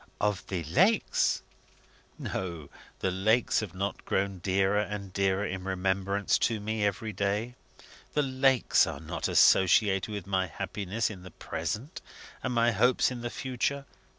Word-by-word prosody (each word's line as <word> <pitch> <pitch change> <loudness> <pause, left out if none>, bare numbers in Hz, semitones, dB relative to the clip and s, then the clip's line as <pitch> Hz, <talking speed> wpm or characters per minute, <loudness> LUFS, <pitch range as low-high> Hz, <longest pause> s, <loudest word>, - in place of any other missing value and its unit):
"Of 105 -3 -1
the 90 -3 -3
lakes?" 185 - +2 0.7
"No. 85 -6 -5 0.3
The 95 - +1
lakes 110 +6 +2
have 100 -5 -6
not 100 +1 -3
grown 95 -1 -1
dearer 95 +2 +2
and 105 -2 -4
dearer 100 +1 +1
in 95 -1 -4
remembrance 95 +1 0
to 115 -2 +1
me 110 +1 -2
every 105 +2 -1
day. 100 +5 -1 0.6
The 150 - +3
lakes 130 -1 +3
are - - -5
not - - -3
associated 95 +1 +4
with 100 -4 -5
my 95 -1 0
happiness 100 +6 -3
in 95 -4 -9
the 90 - -10
present, 120 - -5 0.4
and 130 - -2
my 120 -1 +3
hopes 125 +5 +3
in 125 -1 -6
the 120 - -3
future. 130 +3 -2
100 Hz, 150 wpm, -29 LUFS, 95-115 Hz, 0.7 s, associated